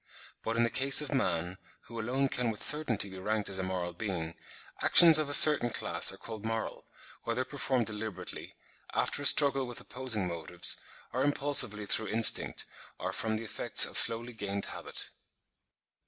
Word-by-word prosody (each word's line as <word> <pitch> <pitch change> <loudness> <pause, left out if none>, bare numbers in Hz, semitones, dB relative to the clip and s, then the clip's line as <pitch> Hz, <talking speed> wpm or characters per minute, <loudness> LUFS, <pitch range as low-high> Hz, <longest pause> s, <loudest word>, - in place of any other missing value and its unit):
But 115 - -5
in 120 - +1
the 115 - -2
case 135 +1 +3
of 150 -1 -7
man, 90 -7 -4 0.2
who 115 0 -12
alone 130 +5 -3
can 125 -2 -4
with 105 -2 -4
certainty 135 -9 +1
be 95 -1 -12
ranked 105 +2 -4
as 95 -1 -2
a - - -3
moral 90 -2 -6
being, 85 -4 -7 0.5
actions 165 -3 +7
of 150 -2 -4
a - - -4
certain 150 -6 +7
class - - -1
are - - -13
called 110 -2 -11
moral, 115 0 -7 0.4
whether 120 +2 -4
performed 130 -4 -3
deliberately, 105 -1 -7 0.4
after - - -2
a 145 - +5
struggle 135 -3 +4
with 120 - -8
opposing 125 -6 -4
motives, 85 0 +1 0.4
or 130 - -3
impulsively 140 -7 +1
through 110 +2 -1
instinct, 110 +2 +1 0.3
or - - -7
from 110 -1 -4
the 110 - -8
effects 110 - +5
of - - -9
slowly 115 +2 +3
gained 100 -2 -6
habit. - - -5
115 Hz, 170 wpm, -28 LUFS, 100-130 Hz, 0.5 s, actions